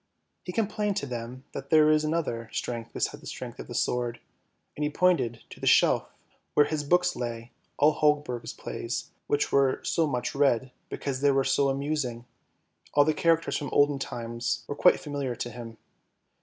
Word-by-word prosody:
He 180 - -4
complained 210 0 -1
to 200 - -1
them 125 0 -6
that 140 0 -7
there 155 -1 +6
is 155 0 +3
another 150 -8 -2
strength 115 -1 -4
besides - - -2
the - - -11
strength - - -7
of - - -7
the - - -7
sword, 120 -1 -1 0.6
and 150 - -3
he 150 - +1
pointed 145 -9 +1
to - - -11
the - - -3
shelf - - +4 0.5
where 145 - +6
his 155 0 -2
old 145 - -10
books 180 0 +3
lay, 120 -1 -5 0.3
all 150 +2 +5
Holberg's 150 -6 +1
plays, 115 0 -5 0.2
which 145 - +1
were 135 -1 +3
so 165 -2 +1
much 125 -4 -2
read, 130 -3 +2 0.2
because 135 -2 -3
they 145 - +4
were 135 -1 +3
so 135 +1 +2
amusing; 135 -4 -2 0.7
all 145 0 +6
the 155 - +2
characters 165 +1 +2
from 145 -3 -4
olden 145 -1 +3
times 120 -2 -3
were - - -3
quite 180 - +5
familiar 140 -5 -3
to 120 - -4
him. 115 -2 -9
140 Hz, 185 wpm, -28 LUFS, 120-150 Hz, 0.7 s, there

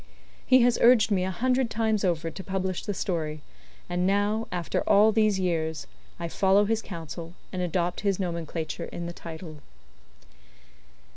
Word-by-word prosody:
He 255 -1 +6
has 245 -1 +3
urged 230 -2 +6
me 185 -2 +2
a 185 - -1
hundred 250 +6 +1
times 220 -2 0
over 165 -3 0
to 190 - -8
publish 190 -1 -2
the 205 - -2
story; 155 -5 -3 0.4
and 180 +1 0
now, 205 +3 +1
after 175 -2 -1
all 210 +2 +6
these 215 -3 +2
years, 160 -4 -1 0.3
I 170 - -3
follow 195 +4 +3
his 225 +1 0
counsel, 165 -2 -8 0.2
and 185 - -2
adopt 175 0 -1
his 200 -2 0
nomenclature 170 -2 -3
in 170 - -6
the 170 - -5
title. 160 -2 -9
185 Hz, 155 wpm, -27 LUFS, 170-210 Hz, 0.4 s, He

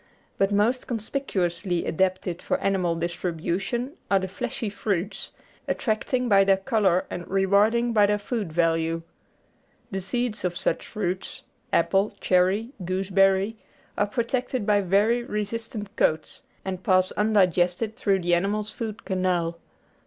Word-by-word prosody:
But 195 +1 +3
most 220 +5 +1
conspicuously 195 -7 -2
adapted 185 0 0
for 275 - 0
animal 190 -8 0
distribution 175 - -2 0.2
are 195 - +4
the 190 0 -1
fleshy 235 +4 -4
fruits, 200 -1 -2 0.4
attracting 245 +2 0
by 200 -3 +6
their 195 0 +4
colour 195 -4 +2
and 175 - -5
rewarding 205 +5 +3
by 210 -2 +5
their 210 0 +2
food 205 -3 -3
value. 165 0 +1 0.9
The 190 -1 -2
seeds 235 +3 -2
of 175 -1 -1
such 165 - -1
fruits 190 -2 -4 0.3
apple, 200 +1 +2
cherry, 190 +6 +2
gooseberry 195 +3 +2 0.4
are 205 - +1
protected 245 +1 -1
by 205 -1 +3
very 205 +6 +3
resistant 210 -1 -4
coats, 155 0 0 0.2
and 190 -1 -3
pass 185 -1 +3
undigested 200 0 +2
through 195 -2 +1
the 175 0 +2
animal's 205 +4 0
food 220 -1 -6
canal. 180 -3 0
195 Hz, 130 wpm, -25 LUFS, 180-220 Hz, 0.9 s, by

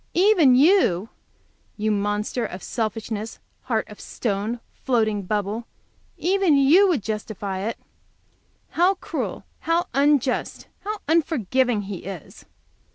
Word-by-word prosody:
"Even 350 -8 +5
you!" 255 - +4 0.7
you 215 0 0
monster 210 +3 -1
of 185 -3 -6
selfishness, 220 -1 -3 0.3
heart 225 -4 -1
of 210 -1 -12
stone, 215 +1 -3
floating 220 -5 0
bubble, 210 +3 -2 0.5
"even 370 -4 +3
you 315 +9 +6
would 310 - +1
justify 210 -2 -4
it!" 220 +4 -3 0.9
How 365 +3 +3
cruel, - - -4 0.2
how 335 +2 +1
unjust, 275 -1 +1
how 425 +1 -4
unforgiving 260 - +1
he 195 -1 -5
is! 185 -3 -9
230 Hz, 110 wpm, -23 LUFS, 210-310 Hz, 0.9 s, you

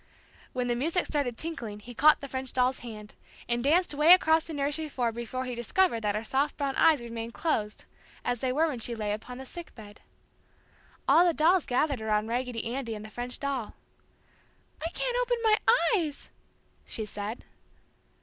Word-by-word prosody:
When 250 -1 -2
the 240 - +1
music 325 +9 0
started 275 -6 -1
tinkling 235 -11 -5
he 245 +4 -10
caught 305 +5 +5
the 280 - -5
French 260 -1 -5
doll's 255 +1 +2
hand, 215 -3 -9 0.3
and 235 0 0
danced 335 +4 +3
'way 300 +4 +7
across 320 -3 +2
the 325 - -7
nursery 290 +2 -1
floor 245 -4 -1
before 235 +3 -4
he 250 - -4
discovered 240 +4 +1
that 210 -1 0
her 215 - -2
soft 270 +5 0
brown 280 -2 -1
eyes 315 -6 +4
remained 230 0 -6
closed 215 -10 -1 0.4
as 245 -1 0
they 255 +1 0
were 310 +5 +2
when 275 -6 -3
she 235 +1 -1
lay 210 -2 -2
upon 230 +4 -5
the 265 - -8
"sick" 340 +5 -9
bed. 210 -2 -13 1.1
All 340 - +7
the 345 -3 +2
dolls 335 +2 +3
gathered 265 -1 +1
around 215 0 0
Raggedy 245 -1 -2
Andy 245 -4 -3
and 210 0 -8
the 215 - -11
French 245 +2 -4
doll. 275 -6 -3 1.1
"I 330 - -1
can't - - -2
open - - +1
my 435 -1 +4 0.3
eyes!" 320 -8 -2 0.5
she 220 - -2
said. 210 +2 -6
255 Hz, 185 wpm, -28 LUFS, 230-310 Hz, 1.1 s, way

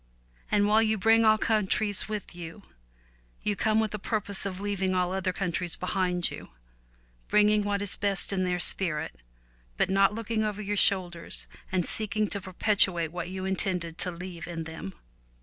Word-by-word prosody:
And 205 0 +3
while 215 +1 +5
you 220 -1 +1
bring 225 +3 +4
all 215 0 +6
countries 215 -1 0
with 210 -3 -5
you, 175 +3 -9 0.8
you 210 - 0
come 215 +3 +2
with 220 -1 -1
a 210 - -3
purpose 200 -2 -3
of 185 -1 -6
leaving 195 -2 -1
all 180 0 0
other 190 -1 -1
countries 180 -2 -1
behind 180 -1 0
you - - -9 0.4
— - - -35
bringing 210 0 +4
what 205 0 -1
is 200 -2 -1
best 200 0 +1
of 195 - -1
their 180 -1 0
spirit, 170 -3 0 0.6
but - - +1
not 195 +1 +3
looking 225 -1 -1
over 210 -1 -2
your 205 0 -2
shoulders 180 -4 +2 0.2
and 185 -2 +1
seeking 215 0 -1
to 200 - -3
perpetuate 185 -3 +3
what 175 0 -5
you 190 0 -5
intended 180 -3 -2
to - - +1
leave 175 -1 -7
in 165 -2 -4
them. 160 -12 -8
190 Hz, 175 wpm, -28 LUFS, 180-210 Hz, 0.8 s, all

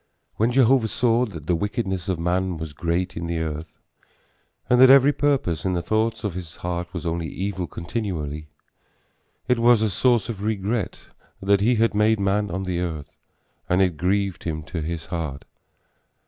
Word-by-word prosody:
When 115 +3 +2
Jehovah 130 -2 +4
saw 120 +2 +2
that 85 -8 -9
the 90 - +1
wickedness 95 0 -2
of 95 - 0
man 90 +1 -1
was 80 -1 -6
great 85 +4 -2
in 85 0 -4
the 85 0 -2
earth, 80 0 -4 0.9
and 125 +1 +4
that 130 - +9
every 140 +2 +7
purpose 135 - 0
in 95 - 0
the 85 - 0
thoughts 110 +5 0
of 105 -4 -2
his 85 -2 -7
heart 90 0 -4
was 85 -3 -6
only 85 0 -2
evil 95 -1 -3
continually, 80 -6 -4 1.0
it 125 -2 +2
was 120 -1 +5
a 110 - +1
source 120 +1 +2
of 110 -5 -5
regret 105 0 -2 0.3
that 100 0 +2
he 120 +4 +3
had 115 0 +2
made 105 +1 +3
man 100 +1 +1
on 95 +2 -3
the 90 -2 -2
earth 80 -5 -5 0.5
and 90 - +3
it 90 -3 +2
grieved 95 +3 0
him 80 -2 -3
to 85 +1 -5
his 85 +1 -4
heart. 80 -5 -5
95 Hz, 175 wpm, -23 LUFS, 85-110 Hz, 1.0 s, that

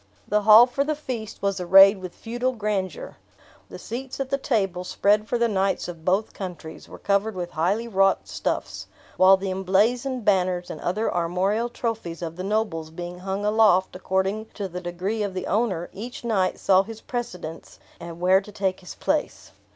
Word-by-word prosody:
The 210 +1 +2
hall 215 +3 +9
for 260 +3 -1
the 305 +1 -1
feast 245 -9 -6
was 200 -1 0
arrayed 195 +3 +7
with 185 -2 -8
feudal 245 +3 -2
grandeur. 210 - -3 0.5
The - - -8
seats 260 +4 -7
at 270 -1 -3
the 275 - +2
table, 195 -9 -1
spread 205 +3 +1
for 240 - 0
the 235 0 +2
knights 195 -2 0
of 170 -2 -9
both 190 +5 0
countries, 175 -4 -8
were - - -10
covered 200 +1 0
with 175 -1 -5
highly 195 +9 0
wrought 195 -3 +2
stuffs; - - -3 0.3
while 190 +1 +6
the 190 0 -3
emblazoned 220 +7 0
banners 180 -3 +1
and - - -8
other 210 +6 -1
armorial 185 +7 0
trophies 225 -8 -4
of 165 -1 -5
the 185 - -6
nobles 195 -6 -1
being 175 +2 -7
hung 195 +2 -3
aloft 210 -4 +3
according 190 +3 -1
to 200 -2 -3
the 180 0 -7
degree 180 +5 -3
of 200 -2 -3
the 185 - -3
owner, 195 -5 0
each 235 +6 -8
knight 200 -6 0
saw 190 -1 +4
his 220 +2 -9
precedence, 180 -10 -6 0.2
and 170 0 -9
where 185 +2 +4
to 210 - -12
take 195 -2 -2
his 180 - -10
place. - - -2
195 Hz, 180 wpm, -24 LUFS, 180-220 Hz, 0.5 s, hall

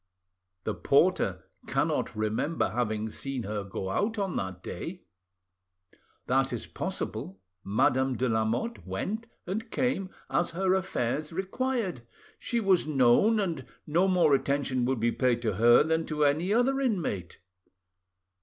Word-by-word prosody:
"The - - -1
porter - - +2 0.2
cannot - - 0
remember 110 +9 0
having 110 -2 -1
seen 135 0 -4
her 105 0 -3
go 95 -1 -5
out 220 - 0
on 195 -3 -1
that 95 -1 -4
day." - - -6 1.2
"That 135 +2 +2
is 120 - -4
possible. 95 +1 -5 0.2
Madame 130 +6 +2
de 130 - +1
Lamotte 115 - -1
went 220 +3 -4 0.2
and 220 +6 -4
came 245 -8 0 0.2
as 175 - +1
her 190 0 +3
affairs 150 -5 -1
required. 195 - -2 0.4
She 235 - -1
was 195 -7 +3
known, 150 - +4
and 170 -9 -1 0.2
no 170 +5 +2
more 180 -6 +4
attention 135 -2 +1
would 130 -1 0
be 115 +1 +2
paid 125 -2 +1
to 110 -5 -1
her 120 +4 +6
than 160 +1 0
to 150 -1 +1
any 155 +7 +1
other 250 +5 +3
inmate." 165 - -2
145 Hz, 135 wpm, -28 LUFS, 120-190 Hz, 1.2 s, her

